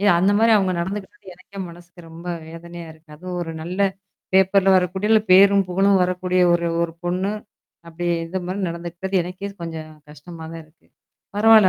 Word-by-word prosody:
இ - - -1
அந்த 190 +3 +3
மாரி 225 +1 +4
அவங்க 190 -2 +1
நடந்துக்கிட்டாது, 195 +2 -6
எனக்கே 185 +2 -14
மனசுக்கு 175 +1 -14
ரொம்ப 165 +2 -11 0.2
வேதனையா 170 +1 -9
இருக்கு. 160 0 -23
அதுவும் 180 +2 -6
ஒரு 165 - -5
நல்ல 180 +4 -5 0.5
பேப்பர்ல 190 0 +4
வரக்கூடிய, 190 +3 0
இல்ல 220 - +6
பேரும் 195 +1 +7
புகழும் 195 +1 +3
வரக்கூடிய 180 0 0
ஒரு 170 0 +1 0.2
ஒரு 170 -1 -2
பொண்ணு. 185 +3 -1 0.6
அப்டி 175 +1 -5 0.2
இந்த 190 +3 -3
மாரி 185 +2 -3
நடந்துக்கிட்டது, 175 +3 -6
எனக்கே 185 +3 -6
கொஞ்சம் 160 -2 -6 0.2
கஷ்டமா 160 +2 -11
தான் 165 0 -8
இருக்கு. 155 +2 -29 0.5
பரவால்ல 215 -2 +7
180 Hz, 165 wpm, -22 LUFS, 170-195 Hz, 0.6 s, பேரும்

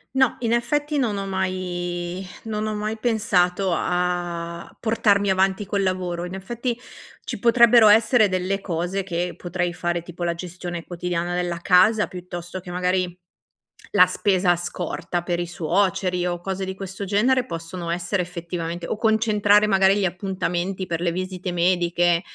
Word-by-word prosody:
No, 265 -2 +3
in 235 -1 0
effetti 295 +5 0
non 230 -7 0
ho 195 0 -3
mai 180 -1 -3 0.2
non 215 -1 -2
ho 215 - -2
mai 215 +1 -3
pensato 195 -5 +1
a 175 -1 -2
portarmi 205 -3 +2
avanti 190 +1 +1
col 200 0 0
lavoro, 180 -2 -2
in 180 - -7
effetti, 235 +6 -3 0.5
ci - - -5
potrebbero 235 -1 +6
essere 220 +1 +5
delle 185 +1 -1
cose 180 +1 -2
che 175 -1 -3
potrei 175 0 -2
fare: 175 0 -2
tipo 175 +1 -8
la 170 -1 +1
gestione 175 0 -6
quotidiana 175 0 -3
della 175 -1 -2
casa, 195 +5 +4
piuttosto 180 0 -7
che 180 0 -9
magari 180 0 0 0.8
la 185 -3 +8
spesa 185 -1 +2
scorta 175 0 -3
per 175 -1 -1
i 175 - -2
suoceri, 180 +1 0
o 175 -1 -2
cose 190 +1 -3
di 190 0 -5
questo 195 +1 -6
genere 245 +6 +2
possono 170 -3 -6
essere 175 +3 -1
effettivamente 170 -1 -5
o - - -2
concentrare 215 -2 +3
magari 195 -1 +4
gli 205 - 0
appuntamenti 185 0 -2
per 170 -2 -3
le 175 -1 +1
visite 185 0 -4
mediche 175 -1 +2
185 Hz, 155 wpm, -23 LUFS, 175-200 Hz, 0.8 s, la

